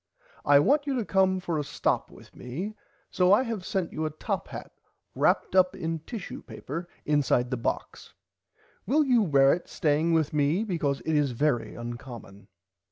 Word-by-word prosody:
I 145 0 +6
want 285 - +3
you 275 - 0
to 235 -4 -1
come 190 -1 +2
for 170 -4 -2
a - - -1
stop 140 - -1
with - - -16
me 165 - -5 0.4
so 180 0 +3
I 210 +6 +6
have 225 -6 -4
sent 185 -2 -2
you 155 - -3
a 155 - 0
top 155 - -4
hat - - -8 0.4
wraped - - +1
up 185 0 +4
in 165 -3 -3
tishu 200 +5 -7
paper 165 +6 -6 0.2
inside 140 -4 +2
the 130 - 0
box. 115 - -4 0.7
Will 300 +4 +4
you 250 -4 +4
wear 140 -7 +5
it 175 - -5
staying 155 +2 +1
with 155 -2 +1
me 150 +7 +2
because 155 -9 -1
it 160 - -1
is 145 -4 +2
very 130 -2 0
uncommon. 120 -4 -9
160 Hz, 175 wpm, -27 LUFS, 140-190 Hz, 0.7 s, I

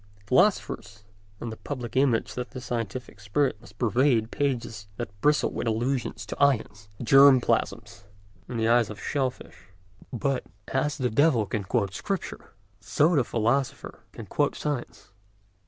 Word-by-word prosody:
Philosophers 105 - +1 0.4
and 115 - -5
the 110 - -8
public 125 -5 -6
imagine 130 -4 +2
that 125 0 -5
the 130 - -7
scientific 115 -3 -5
spirit 105 +3 0
must 120 - -16
pervade 120 -1 +2
pages 115 -7 -2
that 100 -4 -7
bristle 150 0 +3
with - - -3
allusions 115 -1 -1
to 105 - -2
ions, 105 -7 +1
germ 135 +2 +7
plasms, 100 -4 -2 0.4
and 120 - -4
the 110 - +1
eyes 115 -2 +4
of 105 -1 -8
shell 135 -3 0
fish. 100 -5 -15 0.4
But 135 +1 -1 0.3
as 145 +2 0
the 125 -5 -1
devil 125 -2 +3
can 100 0 -3
quote 100 -2 0
Scripture, 195 - -5 0.2
so 150 - +2
the 135 - +4
philosopher 120 +4 -1
can - - -9
quote - - 0
science. 145 -8 -5
120 Hz, 150 wpm, -26 LUFS, 110-135 Hz, 0.4 s, germ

